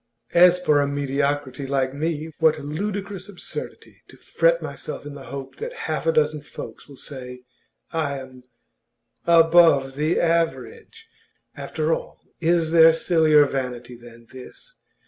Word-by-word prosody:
As 180 +1 +6
for 150 -5 +3
a 140 - 0
mediocrity 140 -1 -2
like 135 -1 -1
me 155 +2 -3
what 160 -1 +3
ludicrous 195 +6 -5
absurdity 195 - -9
to - - -17
fret - - +1
myself - - -7
in 145 - -7
the 140 - -10
hope 135 -1 -8
that 475 +3 -6
half - - -3
a - - +5
dozen 155 -1 +1
folks - - -10
will 140 - -12
say 125 -3 -9 0.5
I 155 -4 -2
am 130 -1 -11 0.9
"above 165 -5 +5
the 155 +4 0
average!" 165 -8 -2 0.5
After 155 +1 -2
all, - - -6 0.2
is 165 -1 +1
there 165 -1 +7
sillier 160 -3 +4
vanity 125 -3 -5
than 120 -1 -15
this? 130 - -13
150 Hz, 140 wpm, -23 LUFS, 135-165 Hz, 0.9 s, there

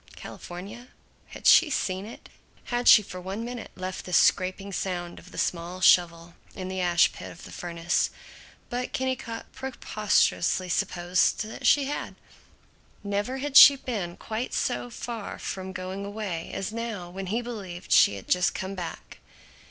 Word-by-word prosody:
California? 200 +8 -9 0.4
Had - - -12
she 330 - +7
seen 190 -7 -2
it? 230 - -11 0.5
Had 240 0 0
she 215 - +9
for 185 -1 -8
one 195 +5 -5
minute 245 -1 -6
left 185 0 -5
this 180 -2 +2
scraping 190 +1 +2
sound 175 -2 -3
of 180 - -15
the - - -11
small 175 +1 -2
shovel 170 -2 +4 0.2
in 185 -1 -5
the 190 0 -3
ash 175 -1 +3
pit - - -8
of 165 - -13
the - - -11
furnace? 170 -1 -1 0.6
But 250 +1 -3
Kennicott 260 -3 -3
preposterously 210 -7 0
supposed 175 +3 +1
that 220 - -4
she 285 - +5
had. 290 - -4 0.9
Never 205 +6 -2
had 280 +1 -4
she 280 -1 +11
been 205 -10 -4
quite 225 +3 -4
so 245 0 -1
far 230 -2 -6
from 190 0 -5
going 190 +1 -5
away 200 -5 -5
as 195 +2 -4
now 225 -7 -5
when 190 +1 -6
he 230 +6 -1
believed 195 -7 -7
she 100 - +6
had 95 - -10
just 180 0 +2
come 190 +1 -4
back. 175 -4 -7
195 Hz, 160 wpm, -27 LUFS, 180-230 Hz, 0.9 s, she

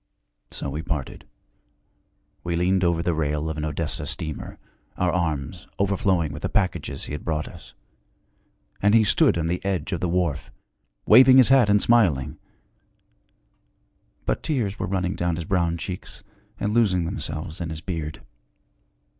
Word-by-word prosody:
So - - -5
we 75 +3 -3
parted. 75 -5 -5 1.2
We 85 -1 -2
leaned 90 +2 +2
over 85 -1 +1
the 85 - +1
rail 75 0 -1
of 80 - -6
an 75 - -3
Odessa 75 0 -3
steamer, 80 -2 -5 0.4
our 90 -1 +1
arms 85 0 -2
overflowing 95 -5 +1
with 75 - -7
the - - -2
packages 85 -9 -1
he - - -7
had 75 - -5
brought 75 -1 -2
us; - - -13 1.1
and 105 +2 +4
he 115 - +6
stood 135 - +3
on 85 - -1
the 85 +2 -2
edge 95 -3 -2
of 85 - -1
the 90 - -1
wharf, 85 -5 -1 0.6
waving 130 0 +8
his 130 -2 +7
hat 130 -5 +5
and 105 0 +5
smiling. 95 - +2 1.9
But - - -1
tears 115 -10 -2
were - - -2
running 90 -1 -1
down 85 -1 -1
his 85 -1 -5
brown 85 -2 0
cheeks 90 +2 -7 0.4
and 105 +1 -1
losing 95 -7 +2
themselves 80 -2 -5
in 85 - -3
his 80 -1 -6
beard. 80 -4 -5
85 Hz, 155 wpm, -24 LUFS, 80-100 Hz, 1.9 s, waving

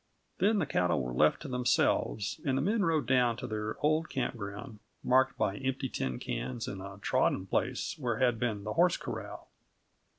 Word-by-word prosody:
Then 210 +2 +3
the 185 - +1
cattle 90 -11 +1
were 60 -1 -3
left 75 - +3
to - - -6
themselves, 125 -4 +1
and 135 -2 +1
the - - +1
men 210 +4 +1
rode 160 -4 +1
down 125 -3 +3
to - - -5
their 110 -2 -3
old 155 +2 +2
campground, 110 -3 -4 0.2
marked 130 +1 +3
by 100 0 0
empty 130 0 -2
tin 65 - -2
cans - - -4
and 95 -1 -5
a 100 +1 -8
trodden 95 - +1
place 95 - -1
where 120 -5 -1
had 120 -2 +2
been 110 -4 -1
the 105 0 -3
horse 175 +1 +4
corral. - - -7
120 Hz, 185 wpm, -31 LUFS, 100-135 Hz, 0.2 s, horse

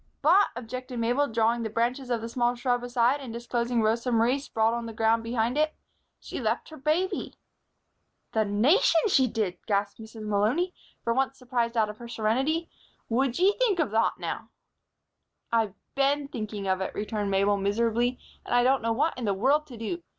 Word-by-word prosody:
"But," 365 +7 +6
objected 250 +1 -6
Mabel, 245 +5 +1
drawing 230 0 +1
the 225 - -2
branches 245 +4 -1
of 235 -2 -1
a - - -3
small 240 +1 0
shrub 245 0 0
aside 245 +2 +2
and 265 -4 -7
disclosing 235 0 -1
Rosa 230 +3 +1
Marie 235 +4 +3
sprawling 230 -3 0
on 235 - -6
the 225 - -7
ground 225 +1 +2
behind 235 +3 -1
it, 310 0 +1 0.4
"she - - -6
left - - -1
her 315 - -10
baby." 310 +7 -1 1.0
"The 220 - +2
Nation, 275 - +3
she 265 -8 +4
did!" 210 -6 -2
gasped 200 0 0
Mrs. 220 0 -10
Malony, 220 - +1 0.3
for 230 - +1
once 265 +1 0
surprised 240 -2 -2
out 220 -1 +3
of 210 - -15
her 240 - -8
serenity. 265 +9 0 0.4
"Wud 250 +2 +1
ye 380 +3 +4
think 455 -7 +3
of 310 -11 0
thot, 225 +1 +2
now!" - - -5 1.0
"I've 225 -4 +1 0.2
been 280 +1 +1
thinking 210 -4 -5
of 190 0 +1
it," 190 - -4
returned 210 -1 -2
Mabel, 200 +1 +2
miserably. 230 +5 +1 0.3
"And - - -1
I 245 - +5
don't 265 +2 +3
know 230 0 0
what 290 +8 +1
in 240 - -3
the 200 -2 +1
world 285 +9 +2
to 250 -5 -10
do. 285 +11 -4
235 Hz, 185 wpm, -27 LUFS, 220-270 Hz, 1.0 s, But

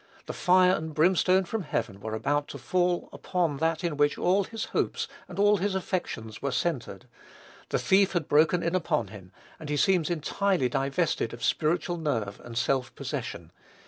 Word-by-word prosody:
The - - -5
"fire 180 0 +4
and 160 -3 -2
brimstone 185 +3 +3
from 220 +5 -3
heaven" 115 - -3
were 110 +1 -4
about 145 +6 0
to - - -7
fall 180 -1 0
upon 170 -6 -1
that 160 +2 0
in 165 -4 -1
which 145 0 +2
all 190 +2 +2
his 225 +1 -5
hopes - - 0 0.2
and 180 -1 -10
all 205 +1 +4
his 195 +1 -1
affections 170 - -4
were 140 - -1
centred. 165 -4 -2 0.6
The - - +1
thief 195 0 +3
had 170 -5 -1
broken 160 +4 +3
in 170 - 0
upon 175 -4 0
him, 95 -4 -12 0.3
and 155 - -8
he 150 - 0
seems 180 -1 +3
entirely 175 -2 0
divested 135 -1 0
of 120 - -11
spiritual 175 +2 0
nerve 115 -11 -2
and 115 -1 -8
self 125 +1 0
possession. - - -5
165 Hz, 175 wpm, -27 LUFS, 140-185 Hz, 0.6 s, fire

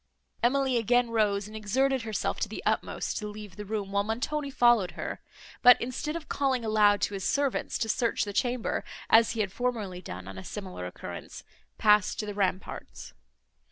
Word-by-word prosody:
Emily 260 +1 +2
again 240 +1 +2
rose, 205 -3 +1
and 215 - -11
exerted 260 +5 +1
herself 220 -2 -2
to - - -1
the - - -6
utmost - - -1
to 210 - -5
leave 210 -1 -9
the 210 - -7
room, 205 -1 -3
while 200 0 +2
Montoni 280 +7 -2
followed 240 -8 +4
her; - - -5 0.4
but, 245 -1 +8
instead 255 +6 -3
of 335 -2 -6
calling 265 -4 0
aloud 210 -2 +4
to - - 0
his 195 -1 -4
servants 280 +2 0
to 225 - -1
search 230 +1 +1
the 205 - -5
chamber, 245 +1 0 0.3
as 225 0 +6
he 225 - -1
had 200 -3 -1
formerly 220 -8 -2
done 90 - -8
on 95 -1 -7
a - - -9
similar 185 - -6
occurrence, 90 - -8 0.3
passed 210 -2 +4
to 215 - -2
the 205 - -4
ramparts. 190 -2 -3
220 Hz, 185 wpm, -28 LUFS, 200-245 Hz, 0.4 s, but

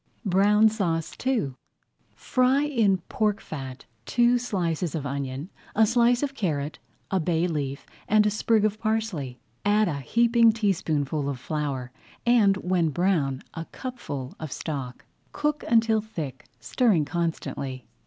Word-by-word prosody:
BROWN 205 +3 +5
SAUCE 175 -7 -1
II 225 - +1 0.6
Fry 255 +2 +2
in 230 -10 +2
pork 210 -1 0
fat 135 -7 -7 0.2
two 240 0 +3
slices 175 -8 -2
of 150 -3 -3
onion, 140 +3 -4 0.2
a 220 +1 +6
slice 240 +3 +3
of 280 -1 -1
carrot, 155 - -2 0.3
a 190 - +2
bay 170 0 +1
leaf, 145 -5 -3 0.2
and 210 0 +4
a 210 - +3
sprig 215 0 +2
of 215 0 -1
parsley. 215 - -2 0.2
Add 210 +1 +3
a 145 -4 -2
heaping 230 - +4
teaspoonful 155 -9 0
of 135 -3 -4
flour 135 -3 -3 0.3
and, 220 -5 +5
when 180 -3 +1
brown, 150 -5 0
a 165 - -5
cupful 155 - -6
of 155 -4 -6
stock. 135 -6 -5 0.3
Cook 300 0 -1
until 225 -1 +3
thick, 155 - -7
stirring 180 - +2
constantly. 140 -6 -3
185 Hz, 135 wpm, -26 LUFS, 145-220 Hz, 0.6 s, a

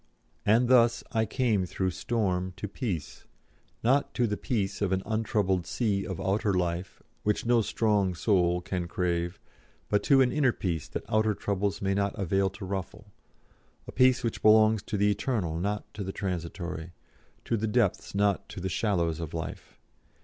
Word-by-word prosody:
And 115 +4 +4
thus 120 -2 +4
I 110 -1 +1
came 110 -6 +1
through 95 +1 -1
storm 95 -3 -1
to 105 - -4
peace, 95 - -5 0.6
not 135 +5 +2
to 125 - +2
the 105 -2 -1
peace 100 -4 -2
of 100 -2 +1
an 95 0 0
untroubled 105 -5 0
sea 100 -5 -1
of 95 - -5
outer 100 0 0
life, 90 0 -2 0.2
which 105 +2 0
no 120 0 +4
strong 105 -4 +1
soul 90 -2 +2
can 90 -1 -3
crave, 85 0 -1 0.5
but 105 - +2
to 135 -2 +6
an 125 -1 +3
inner 135 -4 +2
peace 85 -6 -3
that - - -5
outer 110 -1 +2
troubles 100 -1 -2
may 95 0 +1
not 100 +1 -1
avail 95 0 +1
to 95 +1 -9
ruffle 95 -1 -6 0.8
a - - -6
peace 130 0 +4
which 115 - -2
belongs 110 0 +5
to 105 - -4
the 105 +1 +3
eternal 100 -9 -1
not 105 +3 -2
to 105 - -5
the 95 - -4
transitory, 85 -2 -4 0.5
to - - 0
the 110 0 -1
depths 105 -4 0
not 100 -1 +1
to - - -7
the 95 +1 -3
shallows 85 -6 0
of 80 -1 -5
life. 80 - -6
100 Hz, 170 wpm, -28 LUFS, 90-110 Hz, 0.8 s, to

